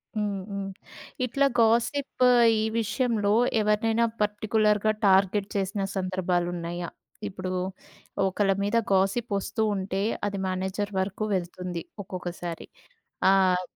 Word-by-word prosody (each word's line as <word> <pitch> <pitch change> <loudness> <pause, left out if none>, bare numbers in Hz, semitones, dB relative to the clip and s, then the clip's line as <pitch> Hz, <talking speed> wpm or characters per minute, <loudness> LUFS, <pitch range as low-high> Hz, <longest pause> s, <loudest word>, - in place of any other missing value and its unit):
హ్మ్. 205 -2 -1
హ్మ్. 200 -1 -3 0.6
ఇట్లా 275 +3 +1
గాసిప్ 235 +4 +2 0.4
ఈ 215 - +1 0.2
విషయంలో 215 -2 +1 0.3
ఎవరినైనా 220 +2 +2 0.2
పర్టిక్యులర్‌గా 210 0 +2 0.2
టార్గెట్ 195 +1 +3
చేసిన 195 +1 -1
సందర్భాలున్నాయా? 175 -2 -2 0.4
ఇప్పుడు 185 -2 -5 0.8
ఒకళ్ళ 195 +1 +1
మీద 205 +3 +1 0.2
గాసిప్ 195 +5 +1
వస్తూ 200 +2 -3
ఉంటే, 190 0 -2 0.2
అది 200 -1 -2
మేనేజర్ 190 +2 -2
వరకు 190 +2 -2
వెళ్తుంది 180 -1 -4 0.2
ఒక్కొక్కసారి. 175 -2 -6 0.6
ఆహ్, 185 -2 +4
195 Hz, 100 wpm, -27 LUFS, 185-215 Hz, 0.8 s, ఆహ్